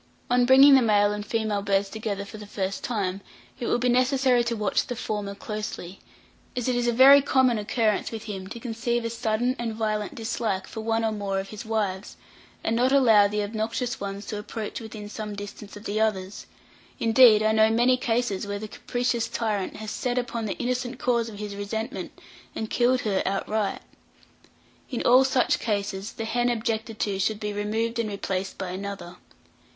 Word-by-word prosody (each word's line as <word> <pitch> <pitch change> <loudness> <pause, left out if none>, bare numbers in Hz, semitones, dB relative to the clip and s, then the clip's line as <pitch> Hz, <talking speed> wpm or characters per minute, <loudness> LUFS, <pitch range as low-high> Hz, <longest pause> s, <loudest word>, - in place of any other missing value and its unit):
On 245 0 +4
bringing 270 +2 +8
the 265 - +7
male 205 -3 +3
and 210 0 -3
female 215 -1 -1
birds 200 0 +1
together 205 -1 -4
for 215 +1 -10
the 210 - -9
first 195 -1 -3
time, 200 -5 -2 0.4
it 240 - -3
will - - +2
be 250 +1 0
necessary 255 0 +3
to 235 0 -1
watch 210 -2 0
the 245 - -4
former 205 -3 -4
closely, 210 -3 -6 0.6
as 245 -1 -2
it 250 - +1
is 245 0 0
a - - +4
very 270 +4 +8
common 260 -4 +3
occurrence 215 0 0
with 225 -2 -6
him 195 -3 -6
to 235 - -8
conceive 235 0 -2
a 230 - -2
sudden 235 +2 0
and 230 -2 -3
violent 215 -2 -2
dislike 220 -4 -2
for 220 - -7
one 225 0 0
or 220 - +1
more 200 -2 -2
of 195 0 -6
his 215 +1 -8
wives, 205 -3 -2 0.5
and 225 - 0
not 250 +3 +2
allow 225 -7 +6
the 210 +1 -1
obnoxious 225 +3 -3
ones 200 +1 -5
to 210 - -4
approach 215 +2 -6
within 215 -2 -8
some 210 0 -6
distance 205 0 -8
of 205 - -12
the 215 0 -1
others; 195 -3 -2 0.5
indeed, 225 -2 +6
I 215 - +3
know 220 0 +5
many 240 +3 +4
cases 230 -5 -1
where 205 0 -3
the 215 +1 -6
capricious 245 +1 -2
tyrant 210 -4 -2
has 215 -1 -6
set 250 0 -2
upon 240 -2 -2
the 200 - -3
innocent 250 0 -2
cause 235 -2 0
of 210 - -10
his 205 -1 -6
resentment 220 +3 -5 0.4
and 220 - -4
killed 250 +1 +3
her 200 -3 0
outright. 200 +2 -1 1.1
In 250 - -3
all 255 +2 +6
such 260 -1 +2
cases, 200 -2 -2
the 225 - -5
hen 240 +2 +1
objected 225 -1 -2
to 200 -2 -1
should 210 +2 0
be 210 -1 -3
removed 220 +3 -1
and 225 -2 -1
replaced 195 -1 -3
by 190 -2 -4
another. 190 -1 -6
220 Hz, 190 wpm, -26 LUFS, 205-240 Hz, 1.1 s, bringing